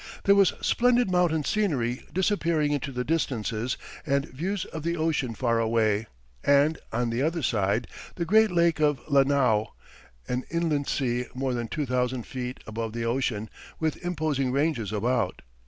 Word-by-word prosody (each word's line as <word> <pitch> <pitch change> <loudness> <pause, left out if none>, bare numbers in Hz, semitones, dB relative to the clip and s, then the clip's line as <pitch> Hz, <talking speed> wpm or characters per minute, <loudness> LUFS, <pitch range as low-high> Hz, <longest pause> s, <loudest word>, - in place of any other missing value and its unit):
There 200 - +6
was 200 -1 +5
splendid 245 -4 +3
mountain 175 -4 +2
scenery 140 - 0
disappearing 170 -6 +1
into 140 -1 -2
the 125 -1 -2
distances, 125 -6 -1 0.3
and 140 -2 +1
views 180 +8 -3
of 160 - -7
the 170 +2 -1
ocean 155 -7 0
far 115 -1 +1
away, 110 -1 +1 0.4
and, 145 +2 +4
on 120 +1 0
the 115 +2 -1
other 160 +2 0
side, 105 +1 +1 0.3
the 170 - -2
great 220 +4 +5
lake 170 -3 +2
of 145 -3 +2
Lanao, 135 -7 +3 0.5
an 125 +1 -1
inland 160 -4 0
sea 125 -2 -1
more 130 0 -1
than 120 -1 -2
two 150 +5 -2
thousand 125 -1 -1
feet 125 -1 -5
above 110 0 -4
the 115 0 -3
ocean, 115 -3 -1 0.3
with 160 0 -2
imposing 155 -6 -1
ranges 135 - 0
about. 120 +4 -1
135 Hz, 155 wpm, -27 LUFS, 120-165 Hz, 0.5 s, There